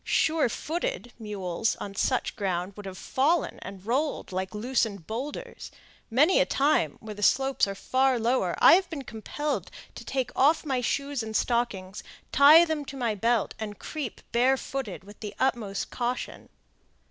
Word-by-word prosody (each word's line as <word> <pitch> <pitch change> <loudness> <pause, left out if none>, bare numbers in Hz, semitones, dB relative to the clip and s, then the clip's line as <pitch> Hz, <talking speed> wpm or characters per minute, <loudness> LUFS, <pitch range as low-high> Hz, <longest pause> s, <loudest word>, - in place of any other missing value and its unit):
"Surefooted" 320 - 0
mules 210 -1 -2
on 200 - -7
such 255 +5 0
ground 185 -1 -2
would 205 -1 -8
have 185 -1 -7
fallen 305 +5 0
and 195 0 -9
rolled 275 +3 -1
like 185 +1 -3
loosened 220 -5 -1
boulders. 250 - -6 0.4
Many 295 +10 +4
a - - +4
time, 270 - +2
where 220 -1 -7
the 210 - -10
slopes 270 +3 +3
are 195 - -4
far 260 +5 +2
lower, 230 -6 +1
I - - +8
have 370 0 +3
been 305 -5 -5
compelled 275 +6 -4 0.2
to - - -9
take 260 -2 -2
off 305 +4 +3
my 265 -4 0
shoes 280 +1 -1
and 220 -1 -6
stockings, 210 -6 -1 0.3
tie 305 +5 +8
them 315 -3 -2
to 275 - -8
my 235 -4 0
belt, 230 +2 +1
and 210 -2 -5
creep 290 -8 -6
barefooted, 255 -3 0
with 205 +2 -14
the 210 -2 -7
utmost 230 -7 -1
caution. 245 0 -4
240 Hz, 160 wpm, -27 LUFS, 205-275 Hz, 0.4 s, I